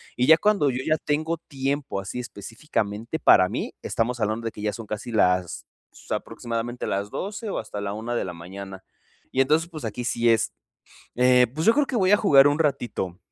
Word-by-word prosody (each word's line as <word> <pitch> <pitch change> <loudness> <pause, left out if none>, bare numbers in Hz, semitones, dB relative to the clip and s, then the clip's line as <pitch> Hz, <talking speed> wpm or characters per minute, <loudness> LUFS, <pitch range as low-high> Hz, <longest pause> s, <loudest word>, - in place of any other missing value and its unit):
y 125 - +1
ya 160 +3 +8
cuando 205 -8 +2
yo 130 +2 -3
ya 155 0 +2
tengo 155 +3 -1
tiempo, 140 -6 -3
así 100 +5 -5
específicamente 115 +2 -4
para 95 - +6
mí, - - -4
estamos 120 +2 -1
hablando 110 +1 -1
de 115 - -2
que 105 - -10
ya 105 0 -1
son 115 -3 -8
casi 105 +3 -5
las 90 -5 +1 0.4
aproximadamente 120 +1 -4
las 100 +1 -2
12, 210 +2 -5
o - - -2
hasta 105 - -6
la 100 0 -3
1 115 +3 -4
de - - -1
la 90 - -5
mañana. 95 +3 -9 0.5
y 130 - +2
entonces 155 +5 +2
pues, 155 -6 -7
aquí 110 +3 -4
sí 120 0 +1
es, 115 -2 +2 0.6
eh, 125 0 +5
pues, 160 +2 -2
yo 225 - +6
creo 295 +2 +2
que 260 - -3
voy 190 -4 +3
a 205 - +7
jugar 145 -10 +6
un 145 +2 +1
ratito, 120 - -1
120 Hz, 205 wpm, -24 LUFS, 105-150 Hz, 0.6 s, ya